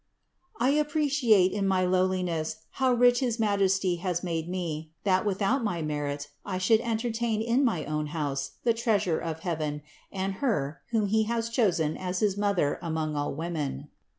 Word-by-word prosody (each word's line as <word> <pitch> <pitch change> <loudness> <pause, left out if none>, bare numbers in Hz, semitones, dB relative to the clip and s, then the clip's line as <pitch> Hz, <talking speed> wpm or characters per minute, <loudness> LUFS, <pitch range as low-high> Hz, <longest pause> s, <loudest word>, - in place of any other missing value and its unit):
I 245 +3 +3
appreciate 290 - +3
in 200 -1 -1
my 185 -1 +2
lowliness 180 -4 0
how 260 -1 +1
rich 245 0 +5
his 240 -3 -1
Majesty 195 -4 +2
has 175 -1 -2
made 165 -2 -2
me, 165 -4 -3
that 190 +1 +2
without 205 +6 +1
my 175 -7 -1
merit 145 -1 -3
I 190 -2 -3
should 200 +4 +4
entertain 230 -1 -1
in 235 +5 +2
my 180 - +1
own 150 0 -2
house 140 -3 -3
the 235 - +3
Treasure 220 -8 +1
of 160 -1 -4
heaven 155 -4 -3 0.3
and 195 0 -2
Her, 155 - -1
whom 225 -3 +1
He 220 +2 +2
has 230 0 -1
chosen 180 -10 +1
as 180 0 -3
his 205 -3 +2
Mother 200 -8 +1
among 160 -3 -2
all 145 -1 -2
women. 155 - -4
185 Hz, 165 wpm, -28 LUFS, 160-225 Hz, 0.3 s, rich